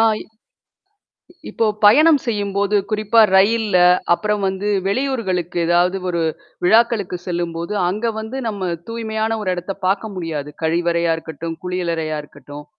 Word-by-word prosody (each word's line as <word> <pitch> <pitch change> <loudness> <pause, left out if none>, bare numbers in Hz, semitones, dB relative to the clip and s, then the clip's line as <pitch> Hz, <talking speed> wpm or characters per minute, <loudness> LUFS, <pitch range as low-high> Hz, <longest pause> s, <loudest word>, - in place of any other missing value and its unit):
ஆ. - - +5 0.2
இ - - -8 1.3
இப்போ 225 - 0 0.2
பயணம் 300 +8 +6
செய்யும்போது 205 -3 0
குறிப்பா 215 +1 +3 0.2
ரயில்ல, 210 0 +3 0.4
அப்புறம் 210 +2 -1
வந்து 190 +2 -2 0.2
வெளியூர்களுக்கு 200 -8 -1
ஏதாவது 175 +2 +2
ஒரு 170 -2 -1 0.4
விழாக்களுக்கு 220 -2 +3
செல்லும்போது, 170 +1 -3
அங்க 210 +6 -2
வந்து 220 +4 -5
நம்ம 190 -4 -3 0.2
தூய்மையான 225 -1 -2
ஒரு 185 - 0
இடத்தை 180 +2 -5
பார்க்க 200 +3 0
முடியாது. 160 -5 -4
கழிவறையா 170 +1 +1
இருக்கட்டும், 165 0 -6
குளியலறையா 170 -4 -2
இருக்கட்டும். 145 0 -12
190 Hz, 120 wpm, -19 LUFS, 170-220 Hz, 1.3 s, பயணம்